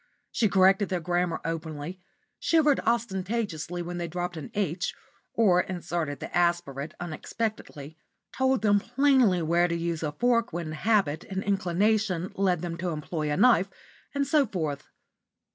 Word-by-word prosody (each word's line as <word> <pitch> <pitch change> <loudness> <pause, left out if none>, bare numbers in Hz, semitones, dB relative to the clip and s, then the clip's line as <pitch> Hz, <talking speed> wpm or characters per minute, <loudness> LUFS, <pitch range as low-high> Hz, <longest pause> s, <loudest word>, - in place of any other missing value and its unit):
She 220 - +2
corrected 195 +1 +4
their 185 -2 0
grammar 175 0 0
openly; 165 +1 -5 0.4
shivered 305 -4 +3
ostentatiously 195 -6 -2
when 175 +1 -5
they 170 - -2
dropped 175 +1 -4
an 155 - -7
"h" 180 -3 -1 0.4
or 185 -6 +4
inserted 170 -5 -3
the - - -7
aspirate 170 -4 0
unexpectedly; 165 -3 -5 0.4
told 265 -2 +1
them 205 -1 +4
plainly 245 -6 +3
where 170 +2 +3
to 170 - -1
use 170 -1 -2
a 155 -2 -1
fork 240 +5 +1
when 170 -2 -4
habit 170 -3 +1
and 190 0 -4
inclination 195 -1 +1
led 185 -4 +1
them 170 -1 -4
to 180 +1 -2
employ 155 -1 -3
a 145 - 0
knife, 215 -7 +5 0.5
and 280 0 +1
so 290 -2 +3
forth. 155 -8 -3
180 Hz, 145 wpm, -27 LUFS, 165-210 Hz, 0.5 s, knife